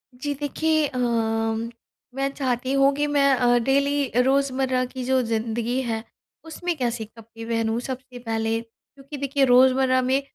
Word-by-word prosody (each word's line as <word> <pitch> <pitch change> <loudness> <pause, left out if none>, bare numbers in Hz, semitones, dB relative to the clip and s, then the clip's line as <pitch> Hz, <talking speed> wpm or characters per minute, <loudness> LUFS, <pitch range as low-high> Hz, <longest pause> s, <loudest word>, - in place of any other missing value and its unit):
जी, 285 +3 -3
देखिए 310 +2 0
अम 225 -2 -1 0.5
मैं 275 0 0
चाहती 255 -1 -2
हूँ 275 0 +4
कि 290 +1 0
मैं 285 -1 +3
अ, 245 -1 +3
डेली 280 +2 +1 0.2
रोज़मर्रा 265 -1 +1
की 255 0 -7
जो 260 0 +2
ज़िंदगी 230 +2 -1
है, 225 -2 -3 0.4
उसमें 340 +2 -4
कैसे 240 -3 -2
कपड़े 225 +1 -12
पहनूँ 225 0 -1
सबसे 255 -1 -7
पहले। 225 -1 -1
क्योंकि 275 +5 -13
देखिए 275 0 +1
रोज़मर्रा 255 +1 +4
में 260 +2 +1
255 Hz, 145 wpm, -24 LUFS, 230-275 Hz, 0.5 s, हूँ